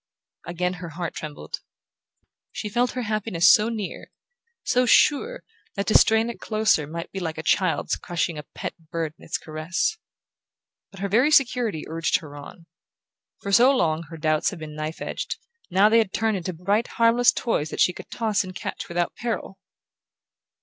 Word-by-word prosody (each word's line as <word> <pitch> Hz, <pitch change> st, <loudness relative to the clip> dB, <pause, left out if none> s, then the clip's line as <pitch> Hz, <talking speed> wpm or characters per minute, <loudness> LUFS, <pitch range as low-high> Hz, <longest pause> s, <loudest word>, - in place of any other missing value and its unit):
Again 180 Hz, +1 st, -1 dB
her 170 Hz, -, -6 dB
heart 170 Hz, +1 st, -5 dB
trembled. 150 Hz, -2 st, -7 dB, 0.9 s
She 210 Hz, -, -5 dB
felt 245 Hz, +4 st, +1 dB
her 250 Hz, -, -3 dB
happiness 210 Hz, -5 st, +4 dB
so 215 Hz, +2 st, +3 dB
near, 215 Hz, -4 st, -5 dB, 0.5 s
so 250 Hz, 0 st, +2 dB
sure, 445 Hz, -, +3 dB, 0.3 s
that 200 Hz, -, -1 dB
to 215 Hz, -, +1 dB
strain 220 Hz, +1 st, +5 dB
it -, -, -13 dB
closer 215 Hz, -9 st, +1 dB
might 165 Hz, +2 st, -6 dB
be 195 Hz, -, -4 dB
like 160 Hz, -3 st, -4 dB
a 160 Hz, -, -5 dB
child's 185 Hz, -1 st, +1 dB
crushing 170 Hz, -1 st, -2 dB
a -, -, -7 dB
pet -, -, -4 dB, 0.2 s
bird 165 Hz, -2 st, -3 dB
in -, -, -17 dB
its -, -, -2 dB
caress. 165 Hz, -, -2 dB, 0.9 s
But 195 Hz, -, -12 dB
her 200 Hz, -, 0 dB
very 235 Hz, +9 st, +3 dB
security 245 Hz, -, +2 dB
urged 165 Hz, 0 st, +1 dB
her 145 Hz, -3 st, -11 dB
on. 155 Hz, +4 st, -11 dB, 0.8 s
For 200 Hz, -, -3 dB
so 240 Hz, +6 st, +7 dB
long 160 Hz, -4 st, +1 dB
her 165 Hz, -, -8 dB
doubts 155 Hz, +1 st, +1 dB
had 195 Hz, -, -8 dB
been 155 Hz, -1 st, -8 dB
knife 155 Hz, +1 st, -5 dB
edged: -, -, -4 dB, 0.3 s
now 195 Hz, +3 st, +5 dB
they 225 Hz, +2 st, +5 dB
had 215 Hz, -4 st, +1 dB
turned 220 Hz, -1 st, +1 dB
into 185 Hz, -1 st, -3 dB
bright 200 Hz, +7 st, 0 dB
harmless 230 Hz, +1 st, +5 dB
toys 160 Hz, -, -1 dB
that -, -, -6 dB
she 180 Hz, -, +4 dB
could -, -, -11 dB
toss 220 Hz, -3 st, 0 dB
and 185 Hz, -1 st, -9 dB
catch -, -, -5 dB
without 175 Hz, 0 st, -1 dB
peril! 225 Hz, -5 st, -4 dB
190 Hz, 175 wpm, -24 LUFS, 165-225 Hz, 0.9 s, so